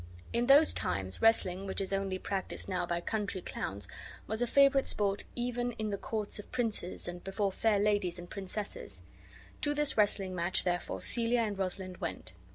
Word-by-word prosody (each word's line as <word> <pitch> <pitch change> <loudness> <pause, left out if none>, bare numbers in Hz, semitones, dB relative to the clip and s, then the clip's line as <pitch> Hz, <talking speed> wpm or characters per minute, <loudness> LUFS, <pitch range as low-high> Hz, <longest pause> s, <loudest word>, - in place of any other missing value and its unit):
In 240 +1 +1
those 285 +3 +7
times 95 0 -2
wrestling, 195 -4 +3
which 190 - -2
is 195 0 -2
only 195 -1 -1
practised 195 0 -3
now 180 -2 -1
by 170 0 -1
country 205 0 -2
clowns, 100 - -4 0.4
was 220 +2 -2
a 245 - +2
favorite 275 +1 +5
sport 200 -1 +1
even 245 0 -1
in 215 -2 -3
the - - 0
courts 215 -1 -3
of 210 - -10
princes, 220 -9 -2
and 175 0 -6
before 195 +1 -1
fair 215 +2 +2
ladies 205 -3 +1
and 175 0 -8
princesses. 200 +2 -5 0.6
To 290 0 +1
this 295 -3 +1
wrestling 200 -2 +4
match, 175 +1 +1
therefore, 175 -1 -2
Celia 235 0 +2
and 210 -3 -1
Rosalind 185 -1 -3
went. 95 0 -5
200 Hz, 175 wpm, -32 LUFS, 185-225 Hz, 0.6 s, those